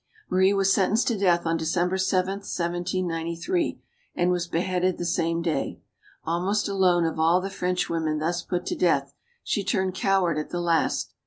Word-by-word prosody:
'* 430 - -30
Marie 190 +1 +4
was 195 -1 +3
sentenced 210 +4 +2
to 235 - +2
death, 180 -4 +2
on 165 0 +1
December 175 +3 0
7, 190 0 0
1 - - -18
793, 175 - -2 0.3
and 175 +1 +2
was 175 -1 -1
beheaded 180 +1 0
the 175 - -4
same 170 -1 0
day. 160 -5 -2 0.4
Almost 180 +6 0
alone 185 -4 +3
of 160 -1 -2
all 165 +3 +4
the 195 +1 -5
Frenchwomen 170 -4 -1
thus 170 +3 -1
put 175 0 -3
to - - -2
death, 140 -5 +1 0.3
she 205 - -1
turned 190 -2 0
coward 185 -4 +1
at 150 - -5
the 175 - -3
last. 170 -2 0
175 Hz, 175 wpm, -25 LUFS, 170-190 Hz, 0.4 s, Marie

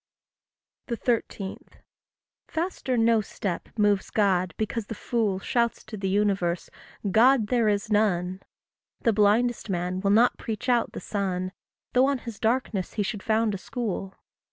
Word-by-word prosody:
13. 230 -5 -2 0.8
Faster 320 -6 -2
no 225 -1 +4
step 195 -3 -4
moves 205 -2 +2
God 185 -4 +1
because 220 0 -2
the 225 - -5
fool 220 -5 0
Shouts 235 +4 0
to 220 - -8
the 195 -2 -2
universe 195 -4 0 0.4
God 230 +1 +5
there 240 -3 +3
is 205 +1 -1
none; 185 -3 +1 0.6
The 230 - +3
blindest 215 +3 +2
man 180 0 -1
will 200 - +1
not 230 +4 +4
preach 225 +3 -4
out 240 -2 +2
the - - -6
sun, 185 -3 -2 0.4
Though 255 +2 +5
on 280 -1 +1
his 230 -4 -8
darkness 220 -5 0
he 210 - 0
should 200 +1 -4
found 220 0 +1
a 195 - -4
school. 195 -4 -4
215 Hz, 145 wpm, -26 LUFS, 195-235 Hz, 0.8 s, God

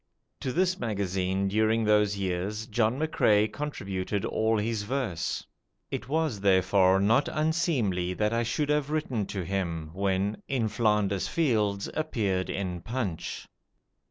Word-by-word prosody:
To 130 - -2
this 185 +4 +1
magazine 95 -3 -1
during 110 +3 +2
those 105 -1 +3
years 100 +3 -2
John 115 +2 +1
McCrae 110 -9 +3
contributed 100 -9 -3
all 110 0 +1
his 110 +1 -1
verse. 105 -6 -2 0.5
It - - -4
was 155 -7 0
therefore 95 0 +4
not 115 +8 +3
unseemly 140 - 0
that 105 +2 0
I 115 - +2
should 120 +6 -1
have 150 -1 +1
written 135 -9 -1
to 95 -3 -3
him, 85 -4 -3
when 100 +2 0
"In 125 -5 0
Flanders 105 -3 +1
Fields" 110 - +1
appeared 105 -12 -1
in 90 -3 -3
'Punch'. 105 -4 -4
105 Hz, 130 wpm, -28 LUFS, 95-125 Hz, 0.5 s, therefore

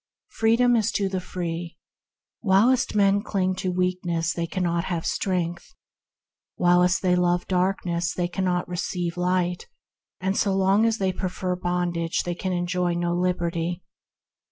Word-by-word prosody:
Freedom 235 +2 +3
is 220 -3 +2
to 200 - +1
the 190 -1 -2
free. 175 -1 -5 0.6
While 215 +5 +4 0.2
men 200 0 +4
cling 185 -3 0
to 185 -1 -1
weakness 180 -3 -1
they 170 -1 -2
cannot 170 -1 -1
have 170 -3 -3
strength; 175 -2 -2 0.8
while 180 0 +4 0.2
they 180 -1 +3
love 175 0 +1
darkness 180 -2 0
they 175 -1 -1
can 185 +2 -2 0.2
receive 175 -1 -3
no 180 - -4
light; 180 -1 0 0.7
so 200 -1 +1
long 195 +3 +3
as 225 -1 +1
they 190 -2 0
prefer 185 0 -2
bondage 175 -2 -1
they 175 - -2
can 185 +2 -3
enjoy 175 0 0
no 175 0 0
liberty. 175 -1 -1
180 Hz, 140 wpm, -25 LUFS, 175-190 Hz, 0.8 s, While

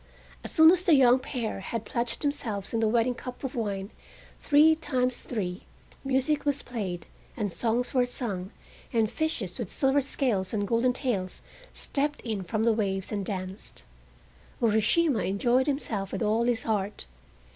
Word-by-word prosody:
As - - -6
soon 320 0 +8
as 365 0 +2
the 340 -4 +5
young 255 -2 +6
pair 245 -6 -4
had 220 +3 -4
pledged 235 +4 -2
themselves 225 -9 -3
in 230 - +1
the 225 - +2
wedding 235 +2 +2
cup 250 +2 -9
of 265 - -3
wine, 200 -3 -3 0.5
three 300 +2 +5
times 255 -5 -1
three, 185 -6 -4 0.4
music 270 +2 +1
was 285 -1 -1
played, 185 -8 -4 0.3
and 205 -6 -2
songs 240 +1 0
were 250 -2 +3
sung, 200 -7 -4 0.4
and 225 -3 +1
fishes 240 - -2
with 225 -6 -3
silver 270 +1 +2
scales 230 -8 -1
and 205 -1 -1
golden 235 +3 +2
tails 215 -9 -2 0.3
stepped 290 +1 -2
in 220 -4 -3
from 210 +4 -2
the 230 0 +4
waves 195 -3 -1
and 200 -3 -3
danced. 190 0 -6 0.7
Urashima 230 +5 +3
enjoyed 240 +8 +2
himself 220 -9 -2
with - - -2
all 220 +2 +2
his 240 -2 +1
heart. 210 -2 -2
235 Hz, 160 wpm, -28 LUFS, 205-265 Hz, 0.7 s, soon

